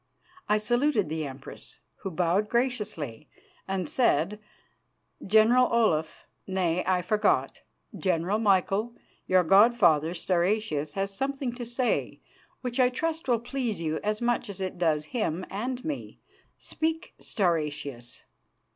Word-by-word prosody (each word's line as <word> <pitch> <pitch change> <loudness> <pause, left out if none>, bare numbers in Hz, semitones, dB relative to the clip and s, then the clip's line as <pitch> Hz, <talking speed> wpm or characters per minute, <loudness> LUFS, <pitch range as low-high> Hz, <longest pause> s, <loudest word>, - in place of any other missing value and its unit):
I 210 - +4
saluted 240 - +1
the 155 -1 -2
Empress, 135 0 -10 0.2
who 195 - -5
bowed 180 +4 +1
graciously 210 - -2 0.4
and 190 -3 -2
said: 205 - +1 0.8
"General 220 +5 +4
Olaf 165 -10 +1 0.2
nay, 180 -2 0
I 180 -1 +2
forgot, 210 +4 +1 0.3
General 185 +2 0
Michael, 205 +2 +1 0.3
your 185 -1 +4
god 205 +7 +6
father 160 -5 +3
Stauracius 175 -4 0
has 195 0 -2
something 270 0 -2
to 240 -1 -6
say 240 +1 -1 0.4
which 250 0 -4
I 250 -1 +5
trust 320 +5 -3
will 240 -2 +3
please 245 -3 -3
you 160 -1 -2
as 210 +2 -1
much 240 -3 0
as 195 - -7
it 185 -2 -4
does 155 -3 +1
him 185 -7 -1
and 250 +7 -4
me. 300 -3 -5 0.4
Speak, 320 0 -3
Stauracius." 150 - -2
200 Hz, 130 wpm, -27 LUFS, 170-240 Hz, 0.8 s, god